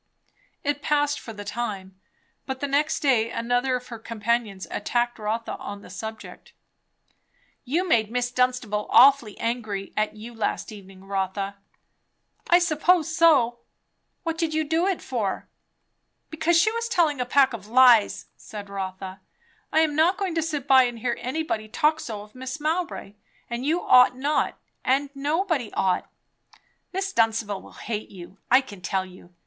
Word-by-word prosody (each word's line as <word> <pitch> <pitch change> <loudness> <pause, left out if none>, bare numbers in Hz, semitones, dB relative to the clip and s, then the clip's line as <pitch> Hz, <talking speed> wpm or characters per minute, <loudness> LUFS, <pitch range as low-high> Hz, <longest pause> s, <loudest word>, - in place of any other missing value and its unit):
It 290 0 -1
passed 290 0 +1
for 225 - -9
the 205 -2 -9
time; 195 -5 -5 0.5
but 265 -1 -4
the 285 - -2
next 285 +2 +1
day 240 -6 +3
another 245 +3 0
of 250 0 -6
her 230 -2 -7
companions 225 -3 -2
attacked 240 -1 -1
Rotha 220 +2 -3
on 205 0 -8
the - - -12
subject. 220 +4 -8 1.1
"You 335 +9 0
made 220 - +3
Miss 245 +1 -1
Dunstable 250 -4 0
awfully 260 -5 +6
angry 220 -4 -3
at 215 0 0
you 225 +3 -9
last 225 -1 -2
evening, 195 -2 -12
Rotha." 195 0 -3 0.9
"I 345 - +7
suppose 340 0 +2
so." 270 -9 +4 0.6
"What 330 -1 -3
did 320 -2 -1
you 315 - +2
do 325 +4 +1
it 385 -3 -1
for?" 220 -7 -3 0.8
"Because 320 +2 +2
she 435 - +4
was 465 0 -3
telling 310 - +2
a - - +2
pack 270 0 +4
of 210 -3 -7
lies!" 240 -2 +5
said 205 -2 -9
Rotha. 190 -1 -6 0.5
"I'm 315 -2 +2
not 335 +5 +3
going 390 -4 -2
to 325 - 0
sit 300 -4 -3
by 265 -2 +7
and 240 -1 -4
hear 235 +1 -1
anybody 255 -5 -3
talk 300 +8 +1
so 215 -8 -6
of 210 - -17
Mrs. 260 +3 -6
Mowbray. 320 - -2 0.4
And 240 +3 -3
you 335 +3 +1
ought 250 0 +6
not; 290 +3 0 0.3
and 275 +2 +1
nobody 295 - -1
ought." 185 -1 0 0.8
"Miss 390 +1 -3
Dunstable 225 -3 +1
will - - -15
hate 215 -2 -5
you, 185 +1 -12
I 255 +2 +6
can 205 -8 -12
tell 190 +1 -1
you. 180 -1 -16
245 Hz, 160 wpm, -25 LUFS, 210-300 Hz, 1.1 s, I